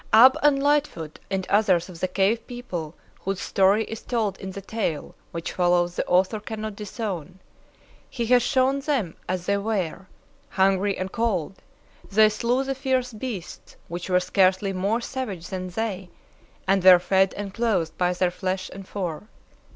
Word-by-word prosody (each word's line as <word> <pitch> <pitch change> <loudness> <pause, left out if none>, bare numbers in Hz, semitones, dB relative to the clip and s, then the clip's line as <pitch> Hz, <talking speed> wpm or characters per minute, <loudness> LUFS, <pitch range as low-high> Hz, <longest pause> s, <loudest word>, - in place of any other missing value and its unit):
Ab 255 +4 +9
and 280 -2 +3
Lightfoot 285 - 0
and 190 -1 -1
others 195 -5 +3
of 180 -3 -11
the 185 - 0
cave 200 +5 +1
people 180 -11 -6 0.2
whose 195 -1 -3
story 200 +3 +3
is 225 0 -7
told 225 -5 -1
in 190 - -6
the 190 - -6
tale 195 -7 -3 0.2
which 165 -1 -4
follows 175 -1 +2
the - - 0
author 185 +4 +2
cannot 215 0 -5
disown. 200 -5 -5 0.7
He 240 -3 -3
has 245 +1 +5
shown 265 +2 +2
them 270 - -1
as 180 -1 -2
they 200 +1 +2
were. 200 -4 -2 0.4
Hungry 195 +1 +2
and 185 0 -4
cold, 200 -6 -1 0.5
they 215 +1 +6
slew 235 +5 0
the 270 0 -2
fierce 260 -2 -1
beasts 215 -5 -7
which 175 +2 -5
were 180 0 +4
scarcely 190 +1 +2
more 200 +6 0
savage 215 -10 -5
than 185 -1 -4
they, 190 -1 -3 0.6
and 195 -1 +3
were 185 -1 +10
fed 190 +2 +2
and 200 -1 -5
clothed 200 -9 0
by 180 0 +2
their 180 0 +1
flesh 185 +1 -3
and 195 0 -10
fur. 185 -1 -4
195 Hz, 165 wpm, -25 LUFS, 185-225 Hz, 0.7 s, were